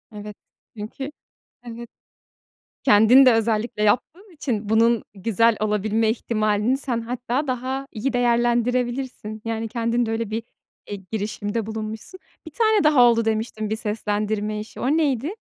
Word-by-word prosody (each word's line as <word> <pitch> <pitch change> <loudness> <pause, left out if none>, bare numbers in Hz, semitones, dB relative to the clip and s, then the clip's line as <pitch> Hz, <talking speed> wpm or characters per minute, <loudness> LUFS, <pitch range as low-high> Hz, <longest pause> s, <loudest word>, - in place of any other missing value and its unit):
Evet. 210 0 -8 0.4
Çünkü 265 +7 -6 0.5
evet, 235 0 -9 1.0
kendin 235 +3 +7
de 255 - +7
özellikle 225 -1 0
yaptığın 340 - 0
için 225 -9 -3
bunun 230 0 +3
güzel 225 +3 +2
olabilme 215 +1 +1
ihtimalini 215 +1 0
sen 250 -4 -2
hatta 250 +4 -3
daha 260 +2 -3
iyi 250 +5 -2
değerlendirebilirsin. 240 -1 0
Yani, 225 0 -2
kendinde 235 0 -1
öyle 225 -1 -2
bir, 225 +1 -3 0.5
eee, 205 - -3 0.2
girişimde 210 0 -3
bulunmuşsun. 220 - -6 0.3
Bir 320 - -9
tane 435 +3 +2
daha 300 -4 +5
oldu 230 -2 +5
demiştin 220 -1 -2
bir 220 - 0
seslendirme 210 -1 -2
işi, 215 - -9
o - - -3
neydi? 295 -2 +1
230 Hz, 130 wpm, -23 LUFS, 215-250 Hz, 1.0 s, kendin